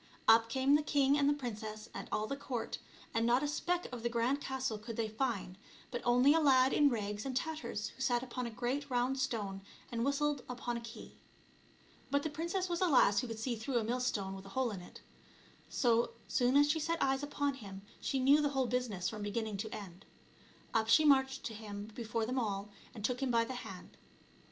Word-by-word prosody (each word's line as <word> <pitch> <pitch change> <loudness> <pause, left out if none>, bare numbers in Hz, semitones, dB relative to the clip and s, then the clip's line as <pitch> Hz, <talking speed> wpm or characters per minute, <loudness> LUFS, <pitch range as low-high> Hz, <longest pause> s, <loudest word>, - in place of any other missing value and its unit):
Up 225 0 +6
came 265 +3 +2
the 295 - +5
king 285 -2 +3
and 285 -1 +3
the - - +4
princess 215 -3 -5
and - - -7
all 215 - 0
the 275 - -3
court, 250 -4 -4 0.3
and 225 - +1
not 240 +4 +3
a - - +1
speck 350 +4 -1
of 245 -2 -6
the 235 - 0
grand 240 +4 +1
castle 265 -5 -2
could 225 +1 -7
they 225 -1 0
find, 215 -5 -2 0.3
but 240 - -3
only 250 +4 +5
a 325 - +4
lad 265 -3 +5
in 290 -1 +5
rags 210 -3 -2
and 265 -2 -2
tatters 305 -8 -3
who - - -13
sat 245 -2 +2
upon 250 -1 -4
a - - -4
great 255 +5 -2
round 255 +2 +1
stone 210 -7 -2 0.3
and 230 -1 -1
whistled 280 0 0
upon 245 -1 -3
a 235 - -4
key. 230 0 -10 0.9
But 285 0 +1
the 315 - -2
princess 340 +5 -2
was 345 0 -2
a 370 - +4
lass 210 -9 +5
who 250 - -2
could 225 -1 -5
see 235 +2 -2
through 240 +3 -2
a 230 - +1
millstone 225 -5 -1
with 195 0 -10
a 195 - -12
hole 255 -3 +2
in 195 -3 -6
it. 180 - -13 0.7
So 235 -2 +2
soon 250 +1 +3
as 290 0 +6
she 320 - 0
set 330 +2 -1
eyes 270 0 +1
upon 285 -1 -1
him 195 -6 -9 0.2
she 270 - -1
knew 280 +3 +5
the 290 - +2
whole 265 -2 0
busi 250 0 0
ness 185 -3 -3
from 215 -1 -4
beginning 210 0 -2
to 220 +2 -4
end. 195 -3 -8 0.7
Up 225 -1 +1
she 310 +7 +6
marched 265 -2 +4
to 225 - -4
him, 210 -1 -7
before 225 0 -2
them 255 +3 -1
all, 205 -3 -2 0.3
and 215 -2 -4
took 250 +2 -1
him 270 - 0
by 230 -1 +3
the 260 - -5
hand. 250 - -9
245 Hz, 225 wpm, -34 LUFS, 220-275 Hz, 0.9 s, Up